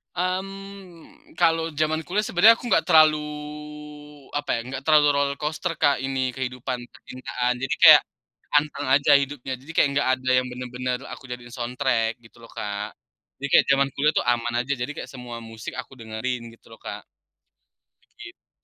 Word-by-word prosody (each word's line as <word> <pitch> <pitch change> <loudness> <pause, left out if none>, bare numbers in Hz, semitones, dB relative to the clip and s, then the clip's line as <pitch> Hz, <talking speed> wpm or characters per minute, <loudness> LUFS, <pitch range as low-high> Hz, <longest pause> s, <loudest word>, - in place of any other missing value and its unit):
Mmm, 195 - -6
kalau 165 -1 +3
zaman 155 +1 -1
kuliah 200 +4 0
sebenarnya 210 +6 +6
aku 240 - -7
nggak 190 - +3
terlalu 155 -3 +6 1.2
apa 145 - -5
ya, 115 - -2
nggak 135 0 -5
terlalu 150 -2 +5
roller 140 0 +1
coaster, 155 +3 -2
Kak, 145 -3 +4
ini 135 -1 -1
kehidupan 125 -1 -4
percintaan. 125 -1 -3
Jadi 135 +1 -2
kayak, - - +10 0.6
anteng 145 -1 -1
aja 145 +2 +4
hidupnya, 135 -1 -3
jadi 145 +5 -10
kayak 140 - +4
nggak 145 - +1
ada 130 0 -3
yang 125 - +1
bener-bener 125 0 -4
aku - - -11
jadiin 120 -1 -7
soundtrack 120 -2 -1
gitu 115 0 -20
loh, 115 - -14
Kak. 105 0 -5 0.5
Jadi 140 - -2
kayak - - +6
zaman 140 0 +3
kuliah 150 +2 +3
tuh - - +1
aman 120 0 -1
aja, 135 +3 -2
jadi 125 - -2
kayak - - -8
semua 125 -2 -8
musik 115 -1 -8
aku - - -18
dengerin 115 +3 -4
gitu 115 - -22
loh, 115 - -12
Kak, - - -6 1.1
begitu. 370 -4 -14
135 Hz, 165 wpm, -24 LUFS, 125-160 Hz, 1.2 s, kayak